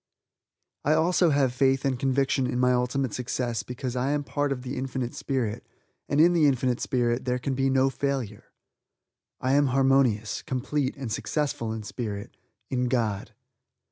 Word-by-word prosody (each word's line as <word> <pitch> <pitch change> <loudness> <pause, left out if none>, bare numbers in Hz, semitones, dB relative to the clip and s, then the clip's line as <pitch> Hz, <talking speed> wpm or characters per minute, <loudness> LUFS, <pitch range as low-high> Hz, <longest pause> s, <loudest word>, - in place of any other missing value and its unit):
I 150 - +3
also 170 +2 +3
have 140 -4 +2
faith 135 +1 +2
and 130 -3 0
conviction 135 0 +1
in 125 - -2
my 125 0 +4
ultimate 125 0 0
success 120 -2 -2
because 125 0 -5
I 125 +2 0
am 145 - 0
a - - -8
part 145 0 -1
of 125 -2 -3
the 130 +2 -4
Infinite 130 -1 -3
Spirit, 120 -5 -2 0.5
and 145 - +1
in 170 +3 +6
the 160 -4 +4
Infinite 125 -2 +1
Spirit, 120 0 0
there 125 -1 +1
can 135 +2 -2
be 135 +1 +1
no 135 0 +3
failure. 130 -7 -3 1.0
I 130 - +1
am 145 0 +4
harmonious, 130 -5 +2
complete 135 +1 -2
and 130 -5 -5
successful 115 -1 -2
in 110 -1 -4
Spirit 105 -2 -5 0.4
in 125 -1 +1
God. 115 -5 -1
130 Hz, 170 wpm, -26 LUFS, 125-140 Hz, 1.0 s, in